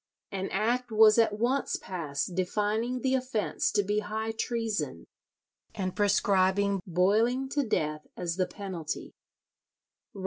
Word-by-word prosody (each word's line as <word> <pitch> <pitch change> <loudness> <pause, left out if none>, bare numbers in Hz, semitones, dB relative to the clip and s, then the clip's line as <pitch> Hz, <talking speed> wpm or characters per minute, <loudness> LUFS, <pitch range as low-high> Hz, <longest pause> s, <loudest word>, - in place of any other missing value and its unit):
An 195 0 -3
act 240 +4 0
was 220 0 +6
at 215 -2 +3
once 250 +5 0
passed 165 -2 -4
defining 210 +7 -1
the 265 +1 +1
offence 255 -5 0
to 205 - +3
be 205 +2 0
high 220 +1 -3
treason, 225 -1 -2 0.7
and 185 -3 -3
prescribing 200 -1 +2
boiling 215 +9 +2
to 290 +1 0
death 155 - -1
as 170 -1 -2
the 185 -1 +1
penalty. 185 -5 -6
210 Hz, 125 wpm, -29 LUFS, 185-230 Hz, 0.7 s, was